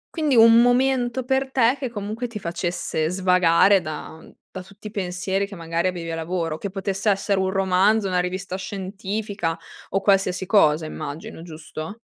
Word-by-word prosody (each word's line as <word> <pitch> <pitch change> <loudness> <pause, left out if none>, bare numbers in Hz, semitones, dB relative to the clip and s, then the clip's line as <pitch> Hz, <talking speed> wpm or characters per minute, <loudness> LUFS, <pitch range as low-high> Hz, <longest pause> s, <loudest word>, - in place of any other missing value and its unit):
Quindi 300 -6 +1
un 230 +1 +8
momento 245 0 +2
per 265 +1 0
te 250 -1 +3
che 260 -2 -4
comunque 220 +2 -4
ti 230 -3 -7
facesse 170 -3 -2
svagare 185 +1 +4
da 155 0 -7 0.3
da 185 - -8
tutti 200 +3 -12
i - - -6
pensieri 190 -1 -2
che 200 - -10
magari 165 +2 -1
avevi 170 -2 -6
a 165 - -3
lavoro, 165 -1 -3
che 200 - -5
potesse 195 +2 -2
essere 195 0 +1
un 190 - 0
romanzo, 195 +2 +2
una 180 -1 +1
rivista 185 +1 -4
scientifica 195 -2 -4 0.3
o 195 - 0
qualsiasi 195 -2 +1
cosa 160 -6 +3
immagino, 155 +1 -7
giusto? 160 +3 -8
190 Hz, 165 wpm, -23 LUFS, 175-215 Hz, 0.3 s, un